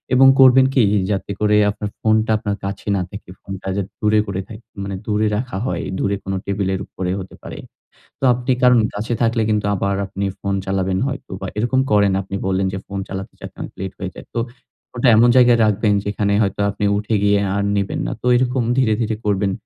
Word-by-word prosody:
এবং 135 Hz, +1 st, +7 dB
করবেন 130 Hz, 0 st, +7 dB
কী? 130 Hz, -, +5 dB, 0.3 s
যাতে 100 Hz, 0 st, -2 dB
করে 105 Hz, 0 st, +4 dB
আপনার 105 Hz, 0 st, -5 dB
ফোনটা 110 Hz, 0 st, +2 dB
আপনার 100 Hz, -1 st, -3 dB
কাছে 100 Hz, +1 st, -6 dB
না -, -, 0 dB
থাকে। 100 Hz, -2 st, -10 dB
ফোনটা 95 Hz, -1 st, -8 dB
যাতে 100 Hz, -1 st, -3 dB
দূরে 105 Hz, 0 st, +3 dB
করে 95 Hz, -1 st, -3 dB
থাকে, 110 Hz, +1 st, -11 dB, 0.2 s
মানে 100 Hz, 0 st, -4 dB
দূরে 105 Hz, 0 st, +1 dB
রাখা 125 Hz, -3 st, -4 dB
হয়, -, -, -2 dB, 0.2 s
দূরে 100 Hz, 0 st, 0 dB
কোন 95 Hz, -, -4 dB
টেবিলের 95 Hz, -1 st, -1 dB
উপরেও 90 Hz, 0 st, -3 dB
হতে 95 Hz, -, -11 dB
পারে। -, -, -8 dB, 0.6 s
তো -, -, -3 dB
আপনি 125 Hz, +2 st, -1 dB
কারণ 125 Hz, -1 st, +6 dB, 0.2 s
কাছে 110 Hz, +4 st, -2 dB
থাকলে 115 Hz, 0 st, +2 dB
কিন্তু 105 Hz, -1 st, +1 dB
আবার 100 Hz, +1 st, -1 dB
আপনি 100 Hz, +1 st, -4 dB, 0.2 s
ফোন 100 Hz, -1 st, -1 dB
চালাবেন 95 Hz, -1 st, 0 dB
হয়তো 135 Hz, -6 st, -7 dB
বা 95 Hz, -, -4 dB
এরকম 120 Hz, +4 st, +1 dB
করেন 100 Hz, -2 st, +4 dB
আপনি 95 Hz, +1 st, -5 dB
বললেন 95 Hz, 0 st, +1 dB
যে 95 Hz, -, -3 dB
ফোন 100 Hz, -, -5 dB
চালাতে 95 Hz, 0 st, -6 dB
যাতে -, -, -9 dB, 0.2 s
লেট 95 Hz, 0 st, -4 dB
হয়ে 95 Hz, -, -4 dB
যায়। -, -, -11 dB
তো -, -, -1 dB, 0.6 s
ওটা 125 Hz, +1 st, +2 dB
এমন 120 Hz, +2 st, +6 dB
জায়গায় 120 Hz, -2 st, +6 dB
রাখবেন 105 Hz, 0 st, +2 dB
যেখানে 100 Hz, 0 st, 0 dB
হয়তো 100 Hz, -1 st, -1 dB
আপনি 105 Hz, -, -4 dB
উঠে 105 Hz, +1 st, -1 dB
গিয়ে 100 Hz, 0 st, +4 dB, 0.2 s
আর 100 Hz, -, 0 dB
নিবেন 100 Hz, -1 st, -1 dB
না। -, -, -3 dB
তো -, -, -4 dB
এরকম 125 Hz, 0 st, +1 dB
ধীরে, 115 Hz, -5 st, +3 dB
ধীরে 110 Hz, -1 st, -1 dB
করবেন। 100 Hz, -1 st, +1 dB
105 Hz, 205 wpm, -20 LUFS, 95-115 Hz, 0.6 s, এবং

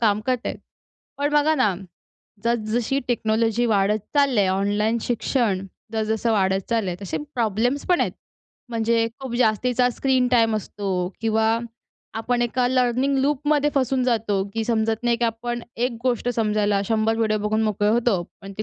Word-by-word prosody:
काम 210 Hz, -2 st, +2 dB
करत 255 Hz, -2 st, 0 dB
आहेत. -, -, -3 dB, 0.6 s
पण 290 Hz, +1 st, 0 dB
बघा 295 Hz, +1 st, +4 dB
ना, 215 Hz, -9 st, +2 dB, 0.7 s
जस-जशी 235 Hz, +2 st, 0 dB
टेक्नॉलॉजी 225 Hz, 0 st, +1 dB
वाढत 210 Hz, -1 st, +2 dB, 0.2 s
चालली 275 Hz, -6 st, +4 dB
आहे. 195 Hz, -, +2 dB
ऑनलाईन 205 Hz, +4 st, +1 dB
शिक्षण 225 Hz, -5 st, 0 dB, 0.3 s
जस-जसं 220 Hz, +1 st, 0 dB
वाढत 190 Hz, -2 st, +1 dB
चालल 225 Hz, -3 st, +1 dB
आहे 175 Hz, -, -3 dB
तसे 195 Hz, -, -3 dB, 0.2 s
प्रॉब्लेम्स 240 Hz, +4 st, 0 dB
पण 355 Hz, -1 st, +3 dB
आहेत. -, -, 0 dB, 0.6 s
म्हणजे 230 Hz, 0 st, +1 dB
खूप 260 Hz, -3 st, -5 dB
जास्तीचा 245 Hz, +2 st, +2 dB
स्क्रीन 260 Hz, 0 st, +1 dB
टाईम 225 Hz, -3 st, +3 dB
असतो 205 Hz, -1 st, -5 dB, 0.3 s
किंवा 225 Hz, 0 st, +2 dB, 0.6 s
आपण 240 Hz, +2 st, 0 dB
एका 245 Hz, +1 st, +1 dB
लर्निंग 255 Hz, +2 st, +1 dB
लूपमध्ये 295 Hz, +1 st, +1 dB
फसून 265 Hz, -1 st, +1 dB
जातो 220 Hz, -5 st, +1 dB
की 225 Hz, 0 st, -1 dB
समजत 225 Hz, 0 st, 0 dB
नाही, 240 Hz, -1 st, +2 dB
की 235 Hz, -, -1 dB
आपण 235 Hz, +1 st, -2 dB
एक 245 Hz, +2 st, 0 dB
गोष्ट 245 Hz, -1 st, 0 dB
समजायला 210 Hz, -2 st, +1 dB
100 225 Hz, 0 st, +1 dB
व्हिडिओ 215 Hz, -1 st, +1 dB
बघून 210 Hz, +1 st, 0 dB
मोकळे 210 Hz, -1 st, +1 dB
होतो. 225 Hz, -4 st, +2 dB, 0.2 s
पण 195 Hz, 0 st, -9 dB
ती -, -, -1 dB
230 Hz, 160 wpm, -23 LUFS, 215-245 Hz, 0.7 s, बघा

